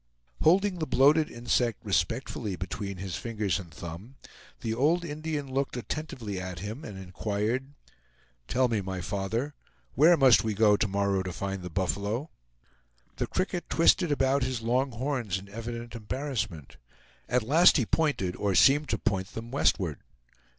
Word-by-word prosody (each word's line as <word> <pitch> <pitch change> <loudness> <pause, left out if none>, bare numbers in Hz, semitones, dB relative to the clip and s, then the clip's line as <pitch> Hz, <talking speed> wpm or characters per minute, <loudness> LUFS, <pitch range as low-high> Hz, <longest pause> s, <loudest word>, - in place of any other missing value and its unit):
Holding 185 +3 +3
the 155 - -2
bloated 145 +4 +4
insect 120 -1 -1
respectfully 105 +2 -1
between 95 +2 -5
his 95 -2 -4
fingers 105 -6 -1
and 90 -3 -9
thumb, 85 - -9 0.5
the 110 -1 -2
old 160 +9 +2
Indian 150 -3 -4
looked 135 -1 -1
attentively 115 -5 -5
at 95 -2 -6
him 110 - -6
and 105 -11 -8
inquired, 105 +8 -3 0.7
"Tell 130 0 +2
me, 115 -4 0
my 95 -1 -4
father, 110 +10 -2 0.4
where 165 +5 +6
must 130 -5 +6
we 110 -2 -1
go 105 0 +5
to 110 - +1
morrow 100 -1 0
to 95 -1 -4
find 95 +2 -4
the 90 - -6
buffalo?" 100 - -2 0.9
The - - -1
cricket 185 -2 -2
twisted 165 0 +4
about 135 0 +2
his 125 -3 -2
long 125 +3 +1
horns 120 -5 -2
in 95 +1 -10
evident 115 +2 -6
embarrassment. 115 - -4 0.5
At 125 -1 +2
last 160 +11 +6
he 125 - +1
pointed, 140 - 0
or 100 -2 0
seemed 145 +9 +5
to - - +1
point, 95 -4 -1
them 115 +1 -7
westward. 90 - +1
115 Hz, 155 wpm, -28 LUFS, 100-140 Hz, 0.9 s, where